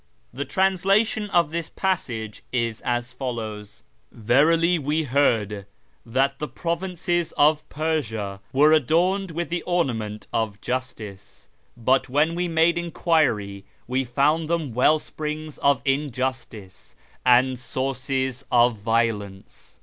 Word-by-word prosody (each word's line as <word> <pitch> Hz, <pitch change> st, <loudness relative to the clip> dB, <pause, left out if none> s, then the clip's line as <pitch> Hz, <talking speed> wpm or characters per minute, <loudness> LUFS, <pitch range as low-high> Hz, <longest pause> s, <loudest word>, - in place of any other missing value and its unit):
The 140 Hz, +3 st, -4 dB
translation 195 Hz, +3 st, +1 dB
of 170 Hz, -5 st, +2 dB
this 165 Hz, 0 st, -3 dB
passage 115 Hz, -, -3 dB
is 115 Hz, -3 st, -1 dB
as 120 Hz, 0 st, -2 dB
follows: 110 Hz, -5 st, -6 dB
— -, -, -41 dB
" -, -, -42 dB
Verily 160 Hz, +9 st, +3 dB
we 150 Hz, +3 st, 0 dB
heard 110 Hz, -8 st, +1 dB, 0.4 s
that 135 Hz, +4 st, 0 dB
the 150 Hz, -, -3 dB
provinces 175 Hz, 0 st, -2 dB
of 150 Hz, +1 st, +3 dB
Persia 115 Hz, -11 st, -2 dB
ivere 150 Hz, +4 st, +5 dB
adorned 180 Hz, +7 st, +1 dB
with 170 Hz, +1 st, -4 dB
the 175 Hz, 0 st, -2 dB
ornament 115 Hz, -13 st, -2 dB
of 110 Hz, -2 st, -1 dB
justiec; 110 Hz, -, -6 dB, 0.4 s
hut 130 Hz, 0 st, +3 dB
when 150 Hz, +5 st, +2 dB
we 175 Hz, +1 st, -1 dB
made 165 Hz, +1 st, +2 dB
enquiry 145 Hz, -, 0 dB, 0.2 s
we 130 Hz, +2 st, 0 dB
fonnd 145 Hz, +6 st, +1 dB
them 160 Hz, -6 st, -1 dB
well 130 Hz, +6 st, +4 dB
springs 155 Hz, 0 st, -6 dB
of 140 Hz, -2 st, +2 dB
injustice 130 Hz, -7 st, -3 dB, 0.3 s
and 125 Hz, 0 st, +4 dB
sources 130 Hz, 0 st, -2 dB
of 120 Hz, -1 st, +4 dB
violence. 105 Hz, -3 st, -2 dB
135 Hz, 125 wpm, -24 LUFS, 115-165 Hz, 0.4 s, ivere